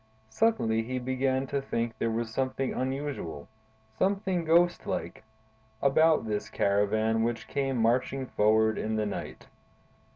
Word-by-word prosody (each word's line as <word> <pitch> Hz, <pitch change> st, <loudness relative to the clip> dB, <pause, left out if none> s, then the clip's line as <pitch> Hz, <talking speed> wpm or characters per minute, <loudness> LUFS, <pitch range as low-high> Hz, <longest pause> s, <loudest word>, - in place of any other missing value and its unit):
Suddenly 115 Hz, -, +2 dB
he 130 Hz, +3 st, -4 dB
began 130 Hz, +1 st, 0 dB
to 140 Hz, +1 st, -2 dB
think 115 Hz, -4 st, -2 dB
there 115 Hz, -, +1 dB
was 115 Hz, 0 st, -3 dB
something 130 Hz, +1 st, -1 dB
unusual, 130 Hz, -, -4 dB, 0.5 s
something 190 Hz, -3 st, 0 dB
ghost 175 Hz, +2 st, +3 dB
like, -, -, -4 dB, 0.6 s
about 155 Hz, +2 st, +3 dB
this 105 Hz, -1 st, -3 dB
caravan 110 Hz, +3 st, +1 dB
which 115 Hz, 0 st, -2 dB
came 135 Hz, -2 st, -1 dB
marching 125 Hz, +3 st, +1 dB
forward 110 Hz, -1 st, +2 dB
in 110 Hz, 0 st, -2 dB
the 110 Hz, -1 st, 0 dB
night. 100 Hz, -, -6 dB
125 Hz, 130 wpm, -28 LUFS, 110-140 Hz, 0.6 s, ghost